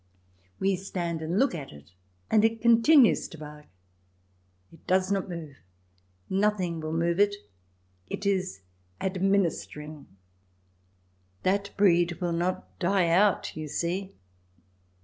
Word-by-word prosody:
We 195 Hz, -1 st, +1 dB
stand 175 Hz, -3 st, -4 dB
and 165 Hz, +4 st, -2 dB
look 270 Hz, 0 st, +3 dB
at 150 Hz, -5 st, -6 dB
it, 75 Hz, +3 st, -15 dB, 0.4 s
and 215 Hz, -, +5 dB
it 225 Hz, 0 st, +2 dB
continues 235 Hz, +3 st, +5 dB
to 165 Hz, -, -12 dB
bark. 150 Hz, 0 st, -11 dB, 1.1 s
It 165 Hz, -, -19 dB
does 185 Hz, +1 st, +2 dB
not 195 Hz, -1 st, -1 dB
move; 160 Hz, -6 st, -7 dB, 0.7 s
nothing 190 Hz, -4 st, 0 dB
will 155 Hz, 0 st, -4 dB
move 170 Hz, +2 st, 0 dB
it. 205 Hz, 0 st, +4 dB, 0.7 s
It 200 Hz, -, -5 dB
is 185 Hz, -, -1 dB, 0.4 s
ad 190 Hz, -1 st, -3 dB
ministering. 155 Hz, -6 st, -1 dB, 1.4 s
That 200 Hz, +1 st, +1 dB
breed 175 Hz, -3 st, +4 dB
will 175 Hz, -1 st, -3 dB
not 175 Hz, +2 st, -3 dB
die 180 Hz, -1 st, +2 dB
out, 190 Hz, +3 st, +2 dB
you 155 Hz, -1 st, -5 dB
see. 185 Hz, +6 st, -3 dB
185 Hz, 125 wpm, -27 LUFS, 165-200 Hz, 1.4 s, and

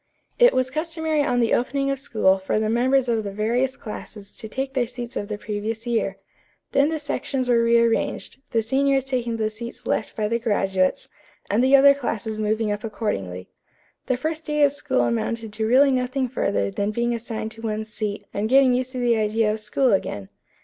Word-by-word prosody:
It -, -, +6 dB
was 255 Hz, 0 st, +1 dB
customary 315 Hz, 0 st, -1 dB
on 250 Hz, -3 st, +1 dB
the 230 Hz, -, +2 dB
opening 275 Hz, +3 st, 0 dB
of 275 Hz, -, -2 dB
school 195 Hz, -7 st, +2 dB
for 190 Hz, +3 st, -1 dB
the 215 Hz, 0 st, 0 dB
members 260 Hz, +2 st, +2 dB
of 225 Hz, -2 st, 0 dB
the 200 Hz, -, -4 dB
various 240 Hz, +6 st, 0 dB
classes 210 Hz, -2 st, -9 dB
to 220 Hz, -, -7 dB
take 265 Hz, +4 st, -4 dB
their 250 Hz, -3 st, +1 dB
seats 245 Hz, 0 st, -7 dB
of 205 Hz, -, -3 dB
the 210 Hz, -1 st, -4 dB
previous 215 Hz, +2 st, -4 dB
year. 225 Hz, -5 st, -1 dB, 0.5 s
Then 280 Hz, +2 st, +3 dB
the 320 Hz, -, -1 dB
sections 280 Hz, -3 st, -2 dB
were 240 Hz, -1 st, +4 dB
rearranged, 230 Hz, +1 st, +1 dB
the 225 Hz, -2 st, +1 dB
seniors 270 Hz, +3 st, +2 dB
taking 245 Hz, -3 st, -2 dB
the 215 Hz, -1 st, -1 dB
seats 235 Hz, +2 st, -8 dB
left 220 Hz, -, -1 dB
by 215 Hz, -1 st, 0 dB
the 230 Hz, +2 st, 0 dB
graduates, 195 Hz, -5 st, 0 dB, 0.4 s
and 220 Hz, +5 st, +3 dB
the 265 Hz, +1 st, +6 dB
other 280 Hz, +1 st, +8 dB
classes 220 Hz, -5 st, -3 dB
moving 215 Hz, 0 st, 0 dB
up 205 Hz, 0 st, -3 dB
accordingly. 100 Hz, -, -4 dB, 0.6 s
The 255 Hz, -, +1 dB
first 315 Hz, +4 st, -3 dB
day 300 Hz, -1 st, +1 dB
of 285 Hz, -1 st, +4 dB
school 285 Hz, -, 0 dB
amounted 210 Hz, -, -2 dB
to 220 Hz, +1 st, -1 dB
really 270 Hz, +4 st, +5 dB
nothing 255 Hz, +1 st, 0 dB
further 200 Hz, -5 st, -1 dB
than 200 Hz, 0 st, -1 dB
being 235 Hz, +2 st, 0 dB
assigned 225 Hz, -1 st, -4 dB
to 225 Hz, -, -12 dB
one's 215 Hz, -1 st, -4 dB
seat 210 Hz, -1 st, -4 dB
and 210 Hz, +2 st, -1 dB
getting 265 Hz, 0 st, +5 dB
used 255 Hz, +1 st, -1 dB
to -, -, -5 dB
the 240 Hz, -2 st, +2 dB
idea 215 Hz, 0 st, +1 dB
of 220 Hz, -, -4 dB
school 215 Hz, +4 st, +1 dB
again. 100 Hz, -, -2 dB
235 Hz, 200 wpm, -23 LUFS, 215-260 Hz, 0.6 s, other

